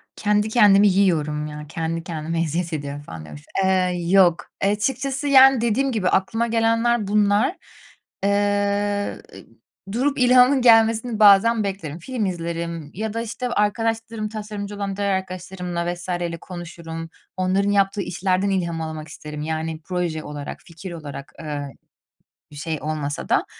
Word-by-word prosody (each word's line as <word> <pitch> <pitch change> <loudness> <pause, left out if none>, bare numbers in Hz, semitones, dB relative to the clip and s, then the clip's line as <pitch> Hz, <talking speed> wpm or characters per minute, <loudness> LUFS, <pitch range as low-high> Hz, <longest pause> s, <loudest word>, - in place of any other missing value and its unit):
"Kendi 210 +1 +1
kendimi 205 -3 +6
yiyorum 155 -6 +1
ya, 150 0 -8
kendi 165 0 -3
kendime 165 0 -3
eziyet 170 +1 -2
ediyorum." 145 -1 -4
falan 80 - -9
diyormuşum. 75 -1 -11 0.2
Eee, 185 -1 +2
yok, 180 -3 +4 0.2
açıkçası, 265 +8 0
yani, 270 -3 +7
dediğim 250 +4 +1
gibi, 210 -6 0
aklıma 225 +5 +1
gelenler 230 -1 +1
bunlar. 210 - +2 0.7
Eee, 205 0 0 0.7
durup 270 +6 0
ilhamın 250 +2 +5
gelmesini 225 -1 +4
bazen 215 +2 +6
beklerim. 180 -5 -4
Film 245 +2 -3
izlerim 170 -3 -4
ya 215 +2 -4
da, 230 - -2
işte, 235 +2 -4
arkadaşlarım, 225 0 -1
tasarımcı 210 -1 -6
olan 200 -1 -4
diğer 200 0 0
arkadaşlarımla 180 -2 -3
vs. 175 +1 -10
ile 175 -1 -2
konuşurum. 165 -2 -8 0.3
Onların 190 +2 +1
yaptığı 200 0 +2
işlerden 185 +1 0
ilham 170 -4 -1
almak 155 -1 -5
isterim, 150 0 -8
yani, 160 +1 -3
proje 175 -4 -2
olarak, 145 -1 -7
fikir 170 +2 -9
olarak, 145 -4 -8
ııı, 145 -3 -4 0.8
bir - - -12
şey 155 +2 -3
olmasa 150 -1 -3
da. - - +2
190 Hz, 135 wpm, -22 LUFS, 165-215 Hz, 0.8 s, yani